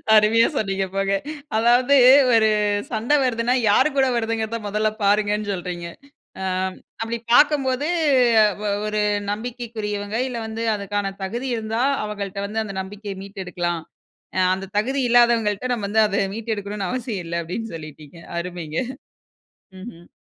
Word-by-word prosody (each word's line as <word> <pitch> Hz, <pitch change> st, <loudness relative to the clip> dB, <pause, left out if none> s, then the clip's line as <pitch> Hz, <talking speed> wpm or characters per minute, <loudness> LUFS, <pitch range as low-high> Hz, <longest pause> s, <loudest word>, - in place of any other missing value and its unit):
அருமையா 220 Hz, +2 st, +5 dB
சொன்னீங்க 195 Hz, -2 st, -1 dB
போங்க. 195 Hz, 0 st, +1 dB, 0.4 s
அதாவது 245 Hz, +4 st, +4 dB, 0.4 s
ஒரு 220 Hz, -1 st, +5 dB, 0.4 s
சண்ட 225 Hz, +4 st, -2 dB
வருதுனா, 240 Hz, 0 st, +1 dB, 0.2 s
யாரு 260 Hz, +8 st, +4 dB
கூட 265 Hz, -1 st, +4 dB
வருதுங்கிறத 230 Hz, 0 st, -1 dB
மொதல்ல 215 Hz, +1 st, +1 dB
பாருங்கன்னு 205 Hz, 0 st, +1 dB
சொல்றீங்க. 175 Hz, -1 st, -5 dB, 0.5 s
ஆ -, -, -3 dB, 0.6 s
அப்டி 230 Hz, +1 st, -3 dB, 0.2 s
பாக்கம்போது 285 Hz, 0 st, +3 dB, 0.8 s
ஒ -, -, 0 dB, 0.2 s
ஒரு 210 Hz, 0 st, -1 dB, 0.3 s
நம்பிக்கைக்குரியவங்க, 215 Hz, -2 st, -4 dB
இல்ல 245 Hz, -2 st, -5 dB
வந்து 225 Hz, +1 st, -4 dB
அதுக்கான 205 Hz, -1 st, -2 dB
தகுதி 240 Hz, +7 st, -3 dB
இருந்தா, 225 Hz, +1 st, -2 dB, 0.2 s
அவங்கள்ட 200 Hz, -2 st, -5 dB
வந்து 220 Hz, +2 st, -2 dB
அந்த 195 Hz, -2 st, -7 dB
நம்பிக்கைய 200 Hz, +1 st, -7 dB
மீட்டெடுக்கலாம். 180 Hz, -4 st, -4 dB, 0.6 s
அ -, -, +2 dB
அந்தத் 190 Hz, +1 st, -7 dB
தகுதி 265 Hz, +5 st, -1 dB
இல்லாதவங்கள்ட 235 Hz, -2 st, +3 dB
நம்ம 205 Hz, -4 st, -3 dB
வந்து 220 Hz, +2 st, +3 dB
அத 200 Hz, -1 st, 0 dB
மீட்டெடுக்கணும்னு 210 Hz, -3 st, -4 dB
அவசியம் 230 Hz, -7 st, -3 dB
இல்ல 170 Hz, 0 st, -2 dB
அப்டின்னு 215 Hz, +5 st, -5 dB
சொல்லிட்டீங்க. 155 Hz, 0 st, -11 dB, 0.2 s
அருமைங்க. 170 Hz, -3 st, -5 dB, 1.0 s
ம்ஹ்ம். 175 Hz, -5 st, -11 dB
210 Hz, 130 wpm, -22 LUFS, 195-230 Hz, 1.0 s, அருமையா